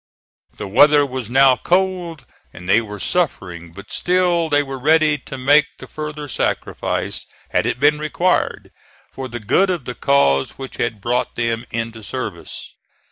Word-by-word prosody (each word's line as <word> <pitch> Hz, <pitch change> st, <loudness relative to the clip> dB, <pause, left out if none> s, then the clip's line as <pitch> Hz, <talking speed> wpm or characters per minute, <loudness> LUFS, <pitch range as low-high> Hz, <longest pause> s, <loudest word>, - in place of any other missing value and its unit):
The -, -, -5 dB
weather 145 Hz, +8 st, +5 dB
was 130 Hz, -4 st, -5 dB
now 135 Hz, +1 st, +5 dB
cold 180 Hz, -1 st, -1 dB, 0.3 s
and 90 Hz, +1 st, -11 dB
they 105 Hz, +4 st, +4 dB
were 105 Hz, -2 st, -8 dB
suffering, 90 Hz, -, -2 dB
but 100 Hz, +3 st, -12 dB
still 175 Hz, -2 st, +1 dB
they 145 Hz, 0 st, +3 dB
were 135 Hz, -1 st, -6 dB
ready 155 Hz, +1 st, +3 dB
to 135 Hz, -, -9 dB
make 145 Hz, +3 st, +4 dB
the -, -, -10 dB
further 150 Hz, -1 st, -6 dB
sacrifice, 135 Hz, -, -3 dB, 0.2 s
had -, -, +1 dB
it -, -, -2 dB
been 150 Hz, +2 st, +3 dB
required, 170 Hz, +4 st, -1 dB, 0.4 s
for 135 Hz, -1 st, -6 dB
the 120 Hz, -1 st, -6 dB
good 185 Hz, -, +2 dB
of 175 Hz, -8 st, -2 dB
the 125 Hz, -, -4 dB
cause 70 Hz, -, +2 dB
which 135 Hz, -1 st, -8 dB
had 110 Hz, -3 st, -2 dB
brought 120 Hz, +4 st, -1 dB
them 115 Hz, 0 st, -1 dB
into 115 Hz, -1 st, -4 dB
service. 105 Hz, -, -6 dB
135 Hz, 160 wpm, -20 LUFS, 115-155 Hz, 0.4 s, weather